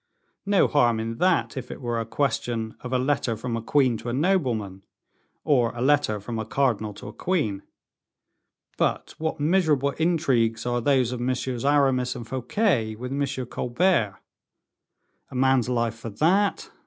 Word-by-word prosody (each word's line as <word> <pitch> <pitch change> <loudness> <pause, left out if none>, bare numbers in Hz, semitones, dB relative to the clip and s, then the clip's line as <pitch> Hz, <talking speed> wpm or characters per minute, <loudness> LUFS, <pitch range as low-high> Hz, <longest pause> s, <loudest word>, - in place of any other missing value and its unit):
No 200 -2 +4
harm 120 -6 +2
in 115 +1 -4
that, 185 -3 +2
if 130 -2 -6
it - - -7
were 120 -2 -2
a 115 - -4
question 115 -4 -1
of 125 - -7
a 130 - +2
letter 130 -3 0
from 115 +1 -3
a 115 - -3
queen 130 0 +2
to 120 - -6
a - - -2
nobleman, 125 - 0 0.6
or 125 -6 +2
a 120 - -5
letter 135 -6 +2
from 115 +3 -5
a - - -2
cardinal 110 -5 0
to - - -10
a - - -11
queen; 145 - -1 1.2
but - - 0
what 160 -1 -2
miserable 150 -4 +2
intrigues 135 -10 +1
are 120 0 0
those 130 -2 +2
of 125 - -4
Messieurs 125 -1 -2
Aramis 135 -3 +2
and 120 -2 -7
Fouquet 130 - 0
with 125 +3 -6
M. 140 -2 -2
Colbert. 120 - 0 1.1
A - - -10
man's 130 -1 +3
life 115 -2 -1
for 115 - -6
that? 180 - +1
125 Hz, 165 wpm, -25 LUFS, 115-145 Hz, 1.2 s, No